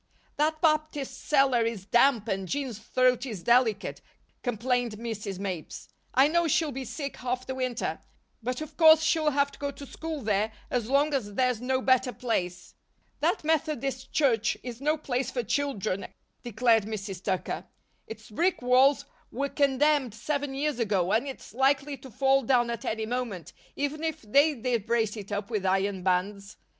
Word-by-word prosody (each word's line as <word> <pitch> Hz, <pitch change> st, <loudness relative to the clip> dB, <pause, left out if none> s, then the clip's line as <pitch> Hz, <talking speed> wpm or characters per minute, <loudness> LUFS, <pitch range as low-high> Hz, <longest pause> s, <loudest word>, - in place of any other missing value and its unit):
"That 310 Hz, +1 st, +1 dB
Baptist 305 Hz, -4 st, 0 dB
cellar 270 Hz, -4 st, +4 dB
is 225 Hz, -4 st, -3 dB
damp 240 Hz, 0 st, +3 dB
and 195 Hz, -2 st, -2 dB
Jean's 260 Hz, -3 st, -3 dB
throat 250 Hz, +2 st, +2 dB
is 215 Hz, -10 st, -6 dB
delicate," 235 Hz, -3 st, +2 dB, 0.4 s
complained 245 Hz, 0 st, 0 dB
Mrs. 215 Hz, -3 st, -5 dB
Mapes. 185 Hz, -5 st, -6 dB, 0.3 s
"I 265 Hz, +2 st, +6 dB
know 340 Hz, +2 st, +2 dB
she'll 315 Hz, 0 st, +1 dB
be 265 Hz, 0 st, -5 dB
sick 280 Hz, +3 st, -5 dB
half 250 Hz, 0 st, -3 dB
the 260 Hz, -, -4 dB
winter; 255 Hz, -2 st, -2 dB, 0.4 s
but 250 Hz, +4 st, -3 dB
of 310 Hz, -, -8 dB
course 320 Hz, -1 st, +7 dB
she'll 320 Hz, -1 st, +2 dB
have 280 Hz, 0 st, +1 dB
to -, -, -16 dB
go 285 Hz, -, -2 dB
to 280 Hz, 0 st, -9 dB
school 320 Hz, +1 st, -6 dB
there 210 Hz, +1 st, 0 dB, 0.2 s
as 240 Hz, -2 st, -1 dB
long 285 Hz, +2 st, +3 dB
as 205 Hz, -7 st, -2 dB
there's 250 Hz, -2 st, +1 dB
no 260 Hz, +1 st, 0 dB
better 255 Hz, -1 st, +3 dB
place." 180 Hz, -8 st, -3 dB, 0.5 s
"That -, -, +1 dB
Methodist 290 Hz, -5 st, -1 dB
Church 230 Hz, -7 st, +2 dB
is 245 Hz, 0 st, -7 dB
no 305 Hz, +2 st, +1 dB
place 260 Hz, -3 st, -2 dB
for 245 Hz, -, -2 dB
children," 220 Hz, -6 st, -1 dB, 0.3 s
declared 230 Hz, -2 st, +2 dB
Mrs. 200 Hz, -3 st, -5 dB
Tucker. 190 Hz, -2 st, -2 dB, 0.4 s
"Its 220 Hz, -1 st, -10 dB
brick 345 Hz, -, 0 dB
walls 260 Hz, +3 st, +4 dB, 0.3 s
were 280 Hz, +3 st, -2 dB
condemned 280 Hz, -3 st, +2 dB
seven 285 Hz, +3 st, -2 dB
years 290 Hz, -1 st, -1 dB
ago 195 Hz, -5 st, +1 dB
and 230 Hz, +6 st, +1 dB
it's 270 Hz, -, -9 dB
likely 275 Hz, +3 st, +2 dB
to 265 Hz, +1 st, -12 dB
fall 270 Hz, +3 st, +3 dB
down 240 Hz, -1 st, +2 dB
at 235 Hz, -, -5 dB
any 220 Hz, 0 st, -2 dB
moment, 230 Hz, -7 st, -4 dB, 0.2 s
even 285 Hz, +2 st, -2 dB
if 320 Hz, -5 st, -3 dB
they 285 Hz, +8 st, +4 dB
did 235 Hz, -3 st, -2 dB
brace 225 Hz, -2 st, +1 dB
it 205 Hz, -2 st, -8 dB
up 205 Hz, +2 st, -3 dB
with 210 Hz, -4 st, -1 dB
iron 190 Hz, 0 st, +1 dB
bands. 195 Hz, +2 st, -1 dB
250 Hz, 170 wpm, -28 LUFS, 220-280 Hz, 0.5 s, course